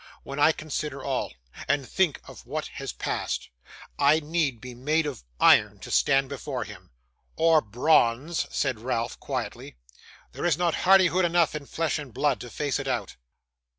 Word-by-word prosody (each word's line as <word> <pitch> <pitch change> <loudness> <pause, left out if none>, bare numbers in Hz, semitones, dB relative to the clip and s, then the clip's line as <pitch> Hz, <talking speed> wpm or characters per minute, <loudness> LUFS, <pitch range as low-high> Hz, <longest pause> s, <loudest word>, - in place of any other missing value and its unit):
'When 140 +1 -6
I 150 +2 +6
consider 150 -3 -5
all, 135 -2 -2 0.3
and 140 -1 +1
think 185 -7 +1
of - - -13
what - - -3 0.2
has - - -4
passed, - - -3 0.5
I 145 +2 +5
need 150 -5 -1
be 125 +2 -9
made 150 +6 0
of 140 - -5 0.2
iron - - +5
to - - -8
stand 135 0 +3
before 135 -2 -4
him.' 95 -4 -12 0.5
'Or 165 -1 +4
bronze,' 125 +5 +2
said 130 -6 -1
Ralph, 115 0 -2
quietly; - - -5 0.6
'there - - -5
is 160 -4 +2
not 175 -2 +1 0.2
hardihood 185 -1 +6
enough 170 -1 +2
in 150 -2 -6
flesh 160 -3 -1
and 145 -4 -8
blood 140 +3 +1
to 125 - -8
face 145 +3 -2
it 135 - -5
out. 130 - -2
145 Hz, 165 wpm, -26 LUFS, 130-160 Hz, 0.6 s, I